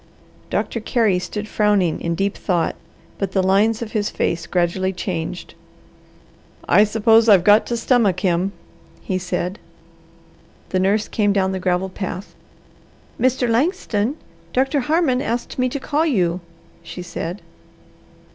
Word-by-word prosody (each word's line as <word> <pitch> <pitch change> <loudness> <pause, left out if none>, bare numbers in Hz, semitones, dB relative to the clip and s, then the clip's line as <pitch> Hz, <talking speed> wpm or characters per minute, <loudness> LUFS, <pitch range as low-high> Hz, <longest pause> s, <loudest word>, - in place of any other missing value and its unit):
Doctor 230 - -1
Carey 215 -4 +1
stood 210 +4 -5
frowning 205 -6 +1
in 170 0 -1
deep 195 +3 -1
thought, 175 -4 -1 0.4
but 195 -2 -2
the 190 - +2
lines 210 +4 +2
of 220 - -8
his 210 -2 -1
face 170 0 -2
gradually 185 +1 0
changed. 180 -2 -5 1.1
"I 210 - +6
suppose 225 +1 +4
I've 195 -4 +7
got 210 +3 +5
to 235 - -1
stomach 225 -6 +2
him," 185 0 +1 0.5
he 185 -1 -2
said. 180 +2 -3 1.1
The 185 - 0
nurse 200 +3 +1
came 205 -2 +1
down 190 -1 +1
the 190 - -3
gravel 180 +1 0
path. 190 0 -6 0.9
"Mr. 255 0 +2
Langston, 245 - 0 0.4
Doctor 270 +3 +2
Harmon 275 -1 +1
asked 240 -1 -3
me 255 0 +2
to 280 - -4
call 300 +4 0
you," 180 - +1 0.4
she 175 +2 -8
said. 175 +2 -6
205 Hz, 135 wpm, -21 LUFS, 185-235 Hz, 1.1 s, I've